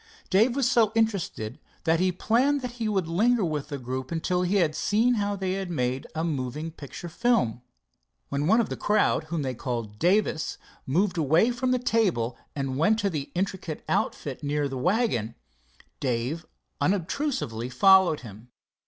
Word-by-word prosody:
Dave 225 +6 +4
was 275 -3 +2
so 225 -3 +4
interested 195 - -1 0.2
that 165 0 +2
he 185 0 +2
planned 250 +10 +2
that 250 -2 -4
he 220 - +1
would 190 -5 0
linger 215 +5 +2
with 150 -3 -2
the 145 -2 -4
group 130 +2 -5
till 180 0 +1
he 180 +2 0
had 170 -6 +3
seen 225 +9 +2
how 205 -2 0
they 190 0 -2
made 130 -7 -2
a 160 - -1
moving 150 0 -3
picture 155 +2 -9
film. 170 - +1 0.7
When 140 +2 -1
one 220 +5 +5
of 230 - +1
the - - -3
crowd 210 -6 +2
whom 155 -1 -3
they 130 -1 -2
called 115 -4 -4
Davis 180 -2 +1 0.3
moved 180 +5 +1
away 160 - +4
from 250 +1 -1
the 255 - +3
table 195 - +1 0.2
and 135 -1 -2
went 210 +7 +4
to 200 -3 0
the 145 -3 -4
intricate 180 -4 -3
outfit 140 -3 -1
near 145 0 0
the 135 - -5
wagon, 155 - 0 0.6
Dave 130 +6 -2 0.3
unobtrusively 185 - -1
followed 190 +4 +5
him. 110 0 -12
170 Hz, 165 wpm, -26 LUFS, 135-210 Hz, 0.7 s, one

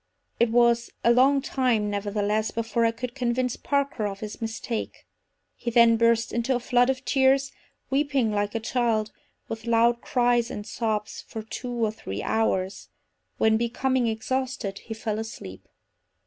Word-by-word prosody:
It 235 - +4
was 235 0 +3
a 235 - +5
long 270 +2 +4
time, 240 -7 +1
nevertheless, 205 +1 -1
before 230 +1 0
I 230 - +3
could 235 +1 -6
convince 250 -1 -1
Parker 280 -6 -1
of 195 -1 -7
his 215 +1 -7
mistake. 225 0 -4 0.5
He 240 - -4
then 235 0 +6
burst 230 0 +2
into 235 +3 +1
a - - 0
flood 245 +1 +2
of 265 0 -2
tears, 270 0 +3 0.4
weeping 275 -5 +1
like 205 +1 -1
a - - +1
child, 225 -2 0 0.4
with 225 +1 -6
loud 235 +1 +3
cries 240 -1 +2
and 205 -4 -6
sobs, 215 -2 -3
for 220 - -6
two 245 +3 -6
or 215 - -1
three 100 - -6
hours, 195 -4 -1 0.5
when 220 0 +3
becoming 245 +2 0
exhausted, 245 -2 -2
he 225 - -7
fell 220 -1 -3
asleep. 95 - -8
230 Hz, 155 wpm, -26 LUFS, 220-250 Hz, 0.5 s, then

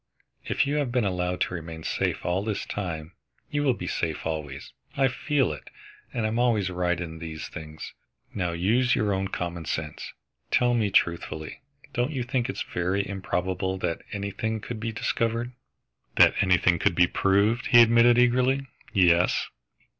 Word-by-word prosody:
If - - +1
you 145 +2 0
have 140 -4 0
been 120 -3 +1
allowed 90 -1 -1
to - - 0
remain 80 -2 -7
safe - - -1
all 90 +3 0
this 105 -1 -2
time, 80 -5 -4 0.4
you 145 - 0
will 135 -4 +2
be - - -6
safe 80 -3 -2
always. 75 -4 -5 0.2
I 135 -1 +4
feel 135 - 0
it, 75 - -11 0.4
and 115 -3 -2
I - - +3
am 115 +2 -1
always 110 -6 +2
right 90 -1 0
in 80 -2 -6
these 80 -2 -6
things. 75 -1 -8 0.4
Now 90 -3 -1
use 115 +9 +2
your 105 -5 +1
own 95 0 -1
common 85 -3 -4
sense. 75 -1 -4 0.4
Tell 120 0 +3
me 110 -4 +1
truthfully, 85 - 0 0.3
don't 120 +2 0
you 135 -5 -2
think 125 0 -1
it - - -3
is - - -3
very 95 +3 -1
improbable 95 0 -2
that 90 -3 -2
anything 105 +2 -3
could 110 +1 -6
be 115 +1 -3
discovered?" 115 +2 -1 0.6
"That - - +7
anything 90 -2 +3
could 85 - +2
be 90 - +6
proved," 100 +7 +2
he 120 - +7
admitted 115 +1 +5
eagerly, 125 +2 +3 0.3
"yes!" 90 -2 +3
95 Hz, 170 wpm, -26 LUFS, 85-120 Hz, 0.6 s, That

